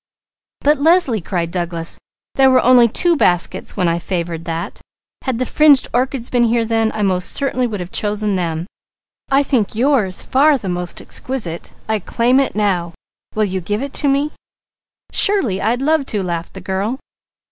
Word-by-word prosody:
"But 295 0 +3
Leslie!" 305 - +3
cried 170 -1 -3
Douglas, 170 -2 -2 0.3
"there 270 -1 +5
were 260 -1 +4
only 245 -1 +6
two 340 +9 +3
baskets 180 - +1
when 180 -3 +1
I 170 0 0
favoured 170 -2 -4
that. 165 -1 -5 0.4
Had 260 -4 -1
the 255 - -1
fringed 295 0 +4
orchids 250 0 0
been 245 -1 +3
here 230 0 +1
then, 225 -1 +1
I 215 - -1
most 185 -2 0
certainly 255 -3 -1
should 205 -4 -4
have 180 +1 -7
chosen 210 -1 -1
them. 165 -2 -2 0.6
I 275 +1 +3
think 240 -7 0
yours 235 -6 +1
far 285 +2 +3
the 200 -7 -6
most 175 -1 -4
exquisite! 210 -11 -5
I 220 -1 0
claim 240 +6 +1
it 275 - -1
now. 180 -5 -1 0.4
Will 215 0 +2
you 190 -1 -3
give 205 +7 -2
it 280 - -6
to 290 - +1
me?" 280 +2 +1 0.8
"Surely! 300 - +2
I'd 240 +4 0
love 305 -2 +1
to," 205 -3 -2
laughed 170 -1 -4
the 190 - -8
girl. 195 +7 -2
220 Hz, 175 wpm, -18 LUFS, 180-265 Hz, 0.8 s, only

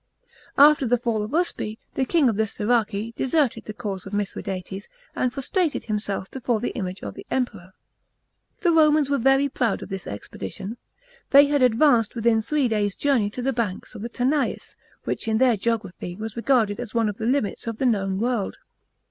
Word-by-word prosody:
After 290 -2 +6
the 245 +2 +3
fall 230 -2 -1
of 210 - -4
Uspe, 300 -9 -1 0.2
the 265 - 0
king 315 -1 +3
of 225 - +1
the 220 +1 +1
Siraci 220 0 0
deserted 265 -4 +1
the 215 - -6
cause 195 -4 -5
of 195 - -9
Mithradates, 195 -1 -4 0.3
and 250 - 0
prostrated 305 +5 -1
himself 205 -3 -3
before 245 -3 -1
the 240 - -2
image 185 -3 -5
of - - -5
the - - -10
Emperor. 210 -8 -3 0.9
The 350 -4 +3
Romans 305 -3 +4
were 280 - +2
very 270 +3 +4
proud 240 -6 -1
of - - -10
this 190 -1 -5
expedition. 105 - -7 0.5
They 280 +1 +8
had 285 -1 +1
advance*! 245 -2 +4
within 230 -1 +2
three 275 +4 +1
days' 210 -3 0
journey 270 -8 +2
of 250 - -2
the 270 +1 +1
banks 225 -6 -3
of - - -8
the 235 - -4
Tanais, 265 +5 -1 0.3
which - - -3
in 220 0 +2
their 250 -1 +4
geography 200 -5 -3
was 220 +2 -6
regarded 230 -4 +2
as 245 -2 -7
one 230 -2 +2
of 210 -1 -3
the 225 - -2
limits 250 -4 -1
of 230 -1 -3
the 265 - -1
known 195 -5 +1
world. 235 -3 -1
230 Hz, 190 wpm, -24 LUFS, 210-265 Hz, 0.9 s, They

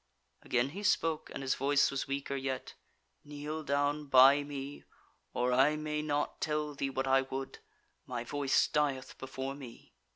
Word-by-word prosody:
Again 125 +2 +1
he 190 +8 -7
spoke, 165 -6 +1
and - - -6
his 135 - +1
voice 140 +1 +3
was 135 0 -2
weaker 140 0 -3
yet: 135 -1 -3 0.5
"Kneel 150 +1 -5
down 145 0 0
by 135 +2 +7
me, 145 0 -6 0.5
or 125 +1 0
I 135 +4 +4
may 150 0 -2
not 145 -1 -2
tell 150 -1 -1
thee 140 -1 -2
what 135 0 -2
I 135 0 +4
would; 135 0 -6 0.5
my 120 -2 -3
voice 140 +2 +2
dieth 140 -3 -1
before 130 +1 -5
me." 130 - -12
140 Hz, 160 wpm, -32 LUFS, 135-150 Hz, 0.5 s, by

